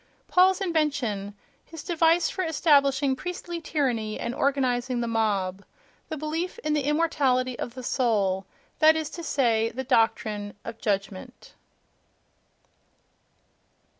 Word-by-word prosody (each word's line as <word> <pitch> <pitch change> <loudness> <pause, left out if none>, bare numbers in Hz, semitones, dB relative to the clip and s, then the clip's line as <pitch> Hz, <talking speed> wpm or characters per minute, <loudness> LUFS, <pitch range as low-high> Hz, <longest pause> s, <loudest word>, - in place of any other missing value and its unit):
Paul's 370 +1 +4
invention, 280 - -1 0.3
his 325 -3 -10
device 330 -1 +3
for 375 - -3
establishing 280 -4 +3
priestly 345 +1 -6
tyranny 245 -9 -1
and 235 - -3
organizing 260 -3 0
the 235 - -1
mob: 200 -4 -1 0.5
the 315 - -4
belief 320 +6 -3
in 305 - 0
the 295 -3 0
immortality 275 -5 +1
of 240 - -5
the 255 - -7
soul—that 220 +6 +1
is 315 -2 -3
to 345 - -7
say, 230 -8 +1
the 260 +4 -5
doctrine 220 -4 0
of 225 - -7
"judgment".... 195 -2 -4
265 Hz, 115 wpm, -26 LUFS, 225-315 Hz, 0.5 s, Paul's